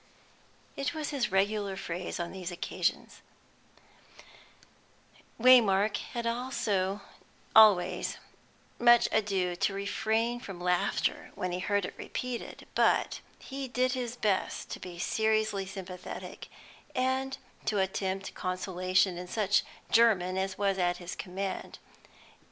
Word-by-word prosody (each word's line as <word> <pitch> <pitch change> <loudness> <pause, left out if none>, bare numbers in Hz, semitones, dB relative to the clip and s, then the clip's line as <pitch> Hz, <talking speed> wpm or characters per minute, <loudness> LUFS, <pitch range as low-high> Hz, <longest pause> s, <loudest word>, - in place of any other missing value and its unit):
It 300 +4 -2
was 305 -2 -3
his 260 -8 -1
regular 200 0 +1
phrase 180 0 -4
on 170 0 -3
these 185 -2 -5
occasions; 175 - -2 2.2
Waymark 220 -5 +6
had 235 -2 -5 1.3
always 190 -5 +5 0.6
much 240 0 +6
ado 195 -4 +1
to 195 - 0
refrain 220 +4 0
from 195 -6 -8
laughter 180 0 0
when 185 - -2
he 180 - -2
heard 205 +1 0
it - - -6
repeated, 250 -2 -5
but - - +2 0.2
he 270 -1 -6
did 255 +1 +1
his 245 -2 -3
best 205 -5 -1
to - - -5
be 180 -1 -8
seriously 215 0 +1
sympathetic, 185 -2 -8 0.5
and 260 +1 0 0.3
to 210 - 0
attempt 190 0 -1
consolation 185 0 0
in 180 - -7
such 205 -1 +2 0.3
German 200 -6 +4
as 190 0 -2
was 195 -1 +1
at 175 0 +1
his 175 0 -7
command. 190 +1 -5
195 Hz, 115 wpm, -30 LUFS, 185-230 Hz, 2.2 s, Waymark